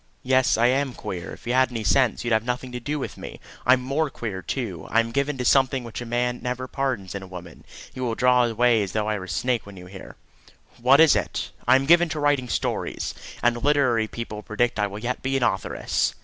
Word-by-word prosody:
"Yes, 130 Hz, -2 st, +3 dB
I 115 Hz, -, +3 dB
am 130 Hz, +1 st, +1 dB
queer. 90 Hz, -2 st, -6 dB
If -, -, -13 dB
you 120 Hz, -, -1 dB
had 130 Hz, 0 st, +4 dB
any 115 Hz, -3 st, -4 dB
sense, 125 Hz, +5 st, +2 dB
you'd 120 Hz, -1 st, 0 dB
have 110 Hz, 0 st, +2 dB
nothing 125 Hz, +1 st, -3 dB
to 125 Hz, -, -5 dB
do 145 Hz, +5 st, -3 dB
with 140 Hz, -, -5 dB
me. -, -, -9 dB, 0.3 s
I'm 125 Hz, 0 st, +5 dB
more 145 Hz, +4 st, 0 dB
queer, 105 Hz, -7 st, -5 dB
too. 95 Hz, -, -4 dB
I 115 Hz, -, +3 dB
am 115 Hz, 0 st, 0 dB
given 140 Hz, +2 st, -1 dB
to 125 Hz, -, -3 dB
something 130 Hz, -1 st, +3 dB
which 115 Hz, 0 st, -7 dB
a 120 Hz, -, -6 dB
man 125 Hz, +1 st, -1 dB
never 125 Hz, +1 st, -3 dB
pardons 130 Hz, -10 st, -3 dB
in 100 Hz, -, -5 dB
a 95 Hz, -, -10 dB
woman. 90 Hz, -2 st, -10 dB, 0.3 s
You 130 Hz, -, -5 dB
will 115 Hz, -2 st, -1 dB
draw 125 Hz, 0 st, +4 dB
away 120 Hz, 0 st, +3 dB
as 100 Hz, -2 st, -3 dB
though 110 Hz, -1 st, -1 dB
I 105 Hz, -1 st, -1 dB
were 95 Hz, -, -7 dB
a -, -, -11 dB
snake 115 Hz, +6 st, -1 dB
when 100 Hz, -1 st, -11 dB
you 90 Hz, -, -10 dB
hear." 95 Hz, +1 st, -11 dB, 0.7 s
"What 130 Hz, +4 st, +6 dB
is 160 Hz, -2 st, +7 dB
it?" -, -, -2 dB, 0.2 s
"I -, -, +7 dB
am 135 Hz, +1 st, +2 dB
given 170 Hz, +2 st, +5 dB
to 155 Hz, -, -3 dB
writing 145 Hz, -4 st, +1 dB
stories, -, -, -2 dB, 0.3 s
and 120 Hz, 0 st, +1 dB
literary 130 Hz, -6 st, +2 dB
people 110 Hz, -2 st, -6 dB
predict 110 Hz, +2 st, -1 dB
I 105 Hz, -, +2 dB
will 100 Hz, +1 st, -8 dB
yet 120 Hz, +4 st, -3 dB
be 135 Hz, +1 st, 0 dB
an 135 Hz, -, -1 dB
authoress." 95 Hz, -5 st, 0 dB
120 Hz, 240 wpm, -24 LUFS, 110-130 Hz, 0.7 s, is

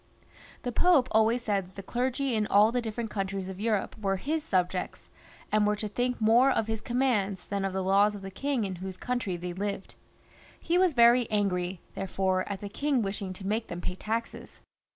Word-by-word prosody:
The 245 Hz, -, -2 dB
Pope 285 Hz, -2 st, +4 dB
always 225 Hz, +2 st, +3 dB
said 200 Hz, -4 st, 0 dB
that 185 Hz, -, -21 dB
the 195 Hz, -, -7 dB
clergy 255 Hz, +4 st, -1 dB
in 215 Hz, -1 st, +1 dB
all 210 Hz, +2 st, +5 dB
the 245 Hz, 0 st, 0 dB
different 225 Hz, 0 st, -4 dB
countries 195 Hz, -1 st, -3 dB
of 190 Hz, 0 st, -7 dB
Europe 215 Hz, -2 st, -1 dB
were 195 Hz, -1 st, +1 dB
his 300 Hz, +10 st, -2 dB
subjects, 185 Hz, -3 st, -2 dB, 0.4 s
and 210 Hz, -1 st, +3 dB
were 210 Hz, -, +2 dB
to 210 Hz, +1 st, -4 dB
think 245 Hz, +4 st, -1 dB
more 230 Hz, +4 st, +5 dB
of 225 Hz, -, +1 dB
his 220 Hz, 0 st, -3 dB
commands 220 Hz, -7 st, 0 dB
than 200 Hz, -1 st, -2 dB
of 195 Hz, -, -1 dB
the 190 Hz, 0 st, -2 dB
laws 200 Hz, +2 st, +3 dB
of 200 Hz, -, -9 dB
the 195 Hz, -, -6 dB
king 275 Hz, +3 st, -1 dB
in 190 Hz, -2 st, -4 dB
whose 185 Hz, +1 st, -6 dB
country 235 Hz, -7 st, -2 dB
they 175 Hz, +1 st, -5 dB
lived. 200 Hz, +1 st, -4 dB, 0.7 s
He 340 Hz, -, -1 dB
was 365 Hz, -5 st, +3 dB
very 235 Hz, 0 st, +5 dB
angry, 185 Hz, -4 st, -1 dB
therefore, 190 Hz, 0 st, -1 dB
at 200 Hz, -1 st, -4 dB
the 205 Hz, -, -5 dB
king 275 Hz, +2 st, 0 dB
wishing 195 Hz, -1 st, -3 dB
to 190 Hz, +1 st, -9 dB
make 220 Hz, +3 st, -1 dB
them 175 Hz, -, -6 dB
pay 180 Hz, -, -3 dB
taxes. 225 Hz, +5 st, -5 dB
210 Hz, 205 wpm, -28 LUFS, 190-240 Hz, 0.7 s, all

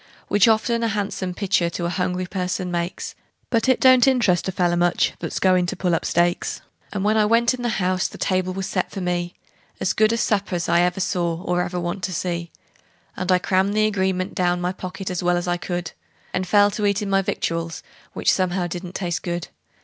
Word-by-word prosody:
Which 205 Hz, +2 st, +5 dB
often 230 Hz, +1 st, +2 dB
a 230 Hz, -, +1 dB
han'some 195 Hz, -4 st, -2 dB
pictur' 185 Hz, -4 st, +1 dB
to 170 Hz, 0 st, -4 dB
a -, -, 0 dB
hungry 180 Hz, 0 st, -1 dB
person 180 Hz, -1 st, -3 dB
makes, 175 Hz, +1 st, -3 dB, 0.4 s
But 230 Hz, +1 st, +2 dB
it 260 Hz, -, +4 dB
don't 255 Hz, 0 st, +6 dB
interest 210 Hz, -11 st, +3 dB
a -, -, 0 dB
feller 175 Hz, -2 st, +1 dB
much 175 Hz, 0 st, +2 dB
that's -, -, -4 dB
goin' 185 Hz, -1 st, +3 dB
to -, -, -3 dB
pull 180 Hz, -1 st, 0 dB
up 165 Hz, -, 0 dB
stakes. 175 Hz, 0 st, +1 dB, 0.3 s
And 200 Hz, -2 st, -2 dB
when 215 Hz, +1 st, +2 dB
I 215 Hz, -, +4 dB
went 230 Hz, +3 st, +3 dB
in 255 Hz, -, -5 dB
the 240 Hz, -2 st, -1 dB
house 185 Hz, -1 st, +1 dB
the -, -, -11 dB
table 185 Hz, -1 st, 0 dB
was 190 Hz, +1 st, -3 dB
set -, -, -1 dB
for 195 Hz, -, -6 dB
me 175 Hz, -1 st, -2 dB, 0.4 s
As 185 Hz, -, 0 dB
good 215 Hz, 0 st, +3 dB
a 230 Hz, -, +1 dB
supper's 200 Hz, -6 st, 0 dB
I 170 Hz, +1 st, +4 dB
ever 180 Hz, +1 st, +1 dB
saw, 175 Hz, -2 st, -1 dB
or 180 Hz, 0 st, 0 dB
ever 180 Hz, 0 st, -2 dB
want 175 Hz, +2 st, -3 dB
to 185 Hz, -, -4 dB
see; 170 Hz, 0 st, -3 dB, 0.7 s
And 185 Hz, 0 st, -1 dB
I 185 Hz, -, +6 dB
crammed 190 Hz, +2 st, +1 dB
the 215 Hz, 0 st, +3 dB
agreement 190 Hz, -3 st, 0 dB
down 180 Hz, -1 st, +1 dB
my 180 Hz, 0 st, -1 dB
pocket 185 Hz, +1 st, -6 dB
as 180 Hz, -, -2 dB
well 175 Hz, 0 st, +2 dB
as 175 Hz, -, -3 dB
I 175 Hz, 0 st, +1 dB
could, 175 Hz, -1 st, -4 dB, 0.4 s
And 185 Hz, 0 st, -1 dB
fell 205 Hz, +2 st, +5 dB
to 205 Hz, 0 st, 0 dB
eatin' 200 Hz, 0 st, 0 dB
my 195 Hz, 0 st, +4 dB
victuals, 165 Hz, -3 st, -3 dB, 0.3 s
which -, -, +2 dB
somehow 185 Hz, -1 st, 0 dB
didn't 175 Hz, +1 st, -6 dB
taste 175 Hz, -1 st, -2 dB
good. 175 Hz, -1 st, -4 dB
185 Hz, 220 wpm, -22 LUFS, 175-200 Hz, 0.7 s, don't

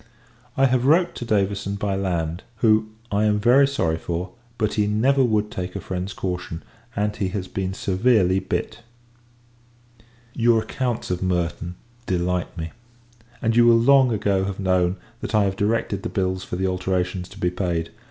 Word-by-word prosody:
I 135 Hz, -, +5 dB
have 130 Hz, 0 st, +2 dB
wrote 170 Hz, +4 st, +4 dB
to 120 Hz, -, -6 dB
Davison, 100 Hz, -2 st, 0 dB
by 100 Hz, -1 st, -1 dB
land: 85 Hz, -3 st, -2 dB
who, 110 Hz, -1 st, +3 dB, 0.2 s
I 105 Hz, +1 st, +2 dB
am 105 Hz, -1 st, +2 dB
very 125 Hz, +6 st, +5 dB
sorry 85 Hz, -13 st, 0 dB
for; 90 Hz, +3 st, -4 dB, 0.3 s
but, 105 Hz, -3 st, 0 dB
he 105 Hz, -1 st, +1 dB
never 130 Hz, +6 st, +3 dB
would 105 Hz, -3 st, +1 dB
take 90 Hz, 0 st, -5 dB
a -, -, -2 dB
friend's 95 Hz, +1 st, -4 dB
caution, 90 Hz, -4 st, -4 dB, 0.3 s
and 105 Hz, 0 st, 0 dB
he 100 Hz, -3 st, -1 dB
has 95 Hz, -1 st, -4 dB
been 95 Hz, 0 st, -3 dB
severely 95 Hz, -2 st, +2 dB
bit. -, -, -3 dB, 1.5 s
Your 115 Hz, -1 st, +3 dB
accounts 120 Hz, -2 st, -3 dB
of 90 Hz, -, -2 dB
Merton 90 Hz, -1 st, -1 dB, 0.3 s
delight 90 Hz, -1 st, -1 dB
me; 80 Hz, 0 st, -4 dB, 0.7 s
and 115 Hz, 0 st, +2 dB
you 120 Hz, 0 st, +6 dB
will 115 Hz, -1 st, +7 dB
long 130 Hz, +1 st, +5 dB
ago 100 Hz, -3 st, +1 dB
have 100 Hz, 0 st, -4 dB
known, 90 Hz, -1 st, +1 dB, 0.2 s
that -, -, -3 dB
I 105 Hz, -, +5 dB
have 95 Hz, -1 st, 0 dB
directed 105 Hz, -1 st, 0 dB
the -, -, -4 dB
bills 95 Hz, -1 st, -1 dB
for -, -, -5 dB
the 95 Hz, +1 st, -1 dB
alterations 90 Hz, -1 st, -1 dB
to 95 Hz, -, -13 dB
be 90 Hz, -2 st, +1 dB
paid. 85 Hz, -3 st, -2 dB
100 Hz, 170 wpm, -23 LUFS, 90-110 Hz, 1.5 s, will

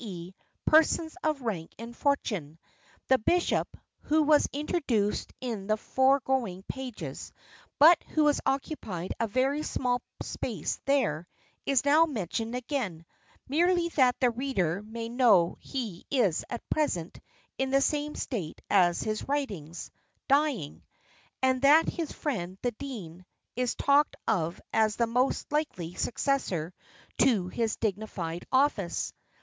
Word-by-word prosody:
e., 180 Hz, -4 st, -7 dB, 0.3 s
persons 320 Hz, +1 st, +4 dB
of 305 Hz, -4 st, 0 dB
rank 185 Hz, -9 st, -3 dB
and 230 Hz, +1 st, -8 dB
fortune. 205 Hz, -, -1 dB, 0.5 s
The 260 Hz, 0 st, +5 dB
bishop, 350 Hz, +10 st, +1 dB, 0.3 s
who 310 Hz, +1 st, +3 dB
was 300 Hz, 0 st, +4 dB
introduced 270 Hz, -, -1 dB
in 225 Hz, -6 st, -4 dB
the 215 Hz, 0 st, +2 dB
foregoing 260 Hz, -7 st, +1 dB
pages, 230 Hz, -, -6 dB, 0.5 s
but 325 Hz, +4 st, +7 dB
who 310 Hz, -1 st, +4 dB
has 295 Hz, -1 st, +3 dB
occupied 250 Hz, -, -2 dB
a 230 Hz, -, +1 dB
very 265 Hz, +7 st, +1 dB
small 250 Hz, -4 st, -1 dB, 0.2 s
space -, -, -3 dB
there, 220 Hz, -, +1 dB, 0.4 s
is 275 Hz, -1 st, +2 dB
now 310 Hz, +3 st, +5 dB
mentioned 225 Hz, -, -3 dB
again, 235 Hz, -, -3 dB, 0.4 s
merely 340 Hz, +4 st, +2 dB
that 255 Hz, -6 st, +3 dB
the 250 Hz, -2 st, +3 dB
reader 215 Hz, -, -1 dB
may 230 Hz, +2 st, -6 dB
know 230 Hz, -8 st, +4 dB
he 225 Hz, -10 st, -5 dB
is 220 Hz, -, +2 dB
at 235 Hz, -, -6 dB
present 180 Hz, -, -1 dB, 0.4 s
in 265 Hz, 0 st, 0 dB
the 270 Hz, +1 st, +4 dB
same 295 Hz, +1 st, 0 dB
state 195 Hz, -, -4 dB
as 175 Hz, -4 st, +4 dB
his 215 Hz, 0 st, -3 dB
writings 200 Hz, -, -3 dB, 0.4 s
dying; 275 Hz, -, +1 dB, 0.6 s
and 260 Hz, -1 st, +3 dB
that 295 Hz, +4 st, +6 dB
his 330 Hz, -4 st, -3 dB
friend, 190 Hz, -, -3 dB
the 245 Hz, -, +1 dB
dean, 210 Hz, -9 st, -8 dB, 0.3 s
is 250 Hz, 0 st, 0 dB
talked 285 Hz, +1 st, +3 dB
of 170 Hz, -3 st, 0 dB
as 215 Hz, -1 st, +3 dB
the 235 Hz, -, +2 dB
most 250 Hz, +5 st, 0 dB
likely 240 Hz, -, -2 dB
successor 185 Hz, -, -1 dB, 0.5 s
to 200 Hz, -8 st, +3 dB
his 225 Hz, +1 st, -1 dB
dignified 190 Hz, -5 st, -3 dB
office. 260 Hz, -10 st, +1 dB
245 Hz, 130 wpm, -29 LUFS, 190-280 Hz, 0.6 s, but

